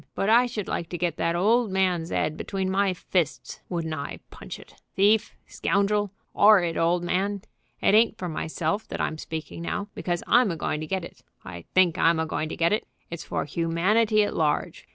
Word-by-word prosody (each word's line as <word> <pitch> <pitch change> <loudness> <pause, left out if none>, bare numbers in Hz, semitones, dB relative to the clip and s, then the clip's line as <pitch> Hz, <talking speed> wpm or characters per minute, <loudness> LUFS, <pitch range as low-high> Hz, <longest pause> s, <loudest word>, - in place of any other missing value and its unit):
But 195 - 0
I 245 +2 +5
should 220 -5 -5
like 165 - -3
to 175 - -4
get 170 -2 -1
that 170 0 0
old 220 +6 +3
man's 185 -3 0
'ead 155 - 0
between 190 +2 -3
my 195 0 +2
fists. 180 -3 -2
Wouldn't 165 -3 -3
I 140 -2 -5
punch - - -9
it! - - -16 0.2
Thief! 210 +3 +3
scoundrel! 205 +1 0 0.2
'orrid 195 -5 +5
old 170 +1 +1
man! 195 +3 -1 0.4
It - - +3
ain't 220 +1 +4
for 180 - -4
myself 160 +4 -2
that - - -6
I'm 155 - -2
speaking 160 +1 -6
now, 205 +4 -3
because 175 -1 -3
I'm 245 -2 +4
a 170 - -2
going 150 -1 -2
to 155 - -5
get 190 0 -2
it, - - -14 0.2
I 85 -1 -9
think 185 -1 +4
I'm 165 0 +4
a 160 - 0
going 155 0 -3
to - - -6
get 170 +3 +2
it; 215 - -1 0.2
it's 170 - -5
for - - -2
humanity 190 +8 +2
at 205 - -3
large. 150 -2 -1
180 Hz, 200 wpm, -26 LUFS, 165-205 Hz, 0.4 s, I